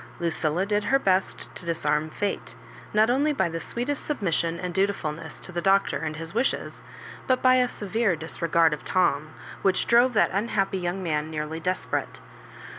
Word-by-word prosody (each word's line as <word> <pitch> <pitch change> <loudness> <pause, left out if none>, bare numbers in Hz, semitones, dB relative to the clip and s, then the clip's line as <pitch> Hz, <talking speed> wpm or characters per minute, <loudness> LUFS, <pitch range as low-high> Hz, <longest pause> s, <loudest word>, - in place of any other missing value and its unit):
Lucilla 170 +1 0
did 205 0 0
her 270 - +4
best 190 -7 0
to - - -7
disarm 160 -2 0
fate, 205 +5 -3 0.4
not 215 +2 +4
only 285 +4 +2
by 265 -11 +1
the 165 0 -4
sweetest 245 - -3
submission 170 - -1
and 180 -1 -4
dutifulness 190 -5 -2
to - - -8
the 175 0 -2
Doctor 195 +2 +3
and 155 -1 -3
his 165 +2 -7
wishes, 240 +5 -1 0.5
but 255 -1 +2
by 255 0 +6
a 250 -1 +3
severe 215 -3 0
disregard 165 0 +1
of 150 - -6
Tom, 160 -4 +1 0.3
which 190 -1 +2
drove 240 +2 +4
that 210 - +3
unhappy 195 -2 0
young 180 +2 -3
man 155 -2 -1
nearly 155 +1 -4
desperate. 180 +3 -2
185 Hz, 170 wpm, -26 LUFS, 165-215 Hz, 0.5 s, by